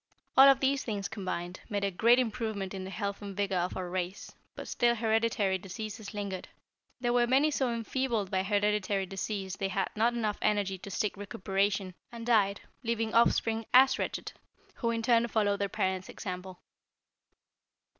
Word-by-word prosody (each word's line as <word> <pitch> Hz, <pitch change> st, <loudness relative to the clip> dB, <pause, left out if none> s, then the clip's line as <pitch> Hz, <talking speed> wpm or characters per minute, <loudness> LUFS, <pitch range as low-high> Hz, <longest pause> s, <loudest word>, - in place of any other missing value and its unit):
"All 270 Hz, +1 st, +9 dB
of 270 Hz, -1 st, +4 dB
these 270 Hz, 0 st, +2 dB
things 205 Hz, -3 st, -3 dB
combined, 185 Hz, -3 st, -5 dB
made 205 Hz, -2 st, -1 dB
a 200 Hz, -, +1 dB
great 230 Hz, +6 st, +5 dB
improvement 220 Hz, -5 st, -2 dB
in 190 Hz, -1 st, -5 dB
the -, -, -6 dB
health 200 Hz, 0 st, -4 dB
and 200 Hz, -1 st, -7 dB
vigor 200 Hz, -2 st, 0 dB
of 180 Hz, +1 st, -2 dB
our 185 Hz, -1 st, -3 dB
race, 180 Hz, +1 st, -4 dB, 0.2 s
but -, -, -7 dB
still 240 Hz, 0 st, +2 dB
hereditary 220 Hz, -4 st, +1 dB
diseases 205 Hz, +3 st, -7 dB
lingered. 200 Hz, -3 st, -5 dB, 0.5 s
"There 240 Hz, -1 st, 0 dB
were 240 Hz, -1 st, +3 dB
many 275 Hz, +5 st, +4 dB
so 265 Hz, -4 st, 0 dB
enfeebled 230 Hz, -3 st, -1 dB
by 190 Hz, -, +2 dB
hereditary 205 Hz, -1 st, +1 dB
disease 195 Hz, 0 st, -4 dB
they 195 Hz, -, -1 dB
had 195 Hz, 0 st, -1 dB
not 230 Hz, +3 st, +2 dB
enough 215 Hz, -3 st, -1 dB
energy 200 Hz, -2 st, +1 dB
to 200 Hz, -, -9 dB
seek 205 Hz, +1 st, -1 dB
recuperation, 195 Hz, -1 st, -1 dB, 0.2 s
and 230 Hz, -1 st, -7 dB
died, 205 Hz, -4 st, +3 dB, 0.2 s
leaving 230 Hz, -2 st, -1 dB
offspring 225 Hz, -1 st, +3 dB
as 265 Hz, +1 st, +7 dB
wretched, -, -, -3 dB, 0.4 s
who 235 Hz, -, -2 dB
in 230 Hz, -1 st, -1 dB
turn 235 Hz, 0 st, +4 dB
followed 205 Hz, -3 st, +1 dB
their 200 Hz, 0 st, -1 dB
parents' 190 Hz, -1 st, -1 dB
example. 185 Hz, -2 st, -7 dB
205 Hz, 170 wpm, -30 LUFS, 195-230 Hz, 0.5 s, All